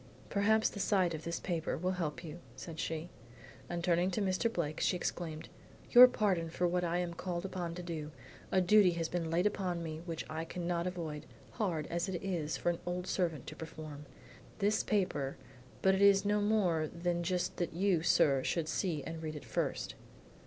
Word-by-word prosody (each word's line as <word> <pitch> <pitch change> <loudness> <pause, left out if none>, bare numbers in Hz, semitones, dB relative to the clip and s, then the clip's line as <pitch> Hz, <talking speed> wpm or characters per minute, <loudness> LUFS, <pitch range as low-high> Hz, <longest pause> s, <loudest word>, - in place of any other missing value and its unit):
"Perhaps 220 +2 +3
the 200 - -8
sight 190 -4 +2
of 155 0 -5
this 170 0 -2
paper 170 -3 -2
will 180 +3 0
help 170 -3 -3
you," 165 +1 -7 0.2
said 165 -2 -8
she. 165 +2 -3 0.6
And 175 -1 -3
turning 175 +1 +3
to 190 - -2
Mr. 190 +4 +1
Blake 155 -6 -2
she - - +2
exclaimed, 165 -3 -4 0.4
"Your 250 +1 +11
pardon 195 -9 0
for 175 +2 0
what 180 +1 0
I 170 0 0
am 175 -1 -2
called 175 +1 -4
upon 175 -3 -4
to 180 - -6
do. 160 -3 -4 0.4
A 190 - +4
duty 185 0 +6
has 165 -1 -1
been 170 -2 -2
laid 170 +3 +1
upon 185 -4 0
me 155 -1 -5
which 165 -2 -4
I 155 +1 -3
cannot 170 0 -2
avoid, 165 -5 -5 0.2
hard 175 -9 -1
as 170 +3 -1
it 180 -2 -2
is 170 -5 -1
for 175 - +1
an 170 - -5
old 180 0 -3
servant 170 -8 -1
to 155 - -7
perform. 155 -2 -8 0.5
This 210 +1 +2
paper 150 -10 0 0.5
but 190 - +5
it 190 - +1
is 200 0 +6
no 210 0 +2
more 190 -7 +2
than 175 +1 -2
just 180 +1 -1
that 175 -3 -2
you, 180 -1 +2
sir, 135 -5 +4
should 165 +2 0
see 160 -2 -1
and 165 0 -6
read 155 -1 -4
it 145 - -8
first." 110 - -2
175 Hz, 195 wpm, -33 LUFS, 160-185 Hz, 0.6 s, Your